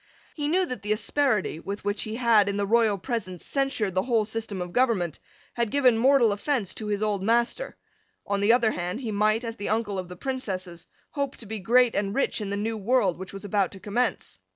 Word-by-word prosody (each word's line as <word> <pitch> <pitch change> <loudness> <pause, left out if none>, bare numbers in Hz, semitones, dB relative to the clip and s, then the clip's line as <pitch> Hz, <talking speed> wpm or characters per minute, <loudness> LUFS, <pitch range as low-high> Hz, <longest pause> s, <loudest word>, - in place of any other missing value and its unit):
He 290 -2 -2
knew 365 +4 +2
that 250 - -5
the 210 +1 0
asperity, 215 - 0
with 200 +4 -6
which 205 0 0
he 215 0 -3
had, 225 -4 +4
in 200 - -2
the 205 - 0
royal 220 -1 +3
presence, 185 -4 -4
censured 270 -8 -1
the 185 - +2
whole 230 -1 +1
system 220 -2 -3
of 180 -1 -5
government, 215 - +1 0.3
had 235 -2 0
given 255 -2 +4
mortal 245 -1 +4
offence 210 0 -1
to 215 - -6
his 205 0 -1
old 205 -2 0
master. 235 - 0 0.5
On 200 0 -1
the 205 +3 +4
other 235 -2 +4
hand 180 +7 -4
he 230 -4 -3
might, 215 +3 +2
as 230 -1 -5
the 205 - -4
uncle 210 -3 -1
of 180 -1 -6
the 180 - -8
Princesses, 185 -8 -5 0.2
hope 280 -2 -2
to 230 - -10
be 220 +1 -5
great 240 +4 +4
and 200 0 -1
rich 275 - +1
in 205 - -3
the 200 - -2
new 220 +2 -2
world 205 -5 +1
which 190 - -7
was 195 +1 -8
about 200 -1 +1
to 195 - -10
commence. 230 +6 -2
215 Hz, 225 wpm, -26 LUFS, 200-240 Hz, 0.5 s, had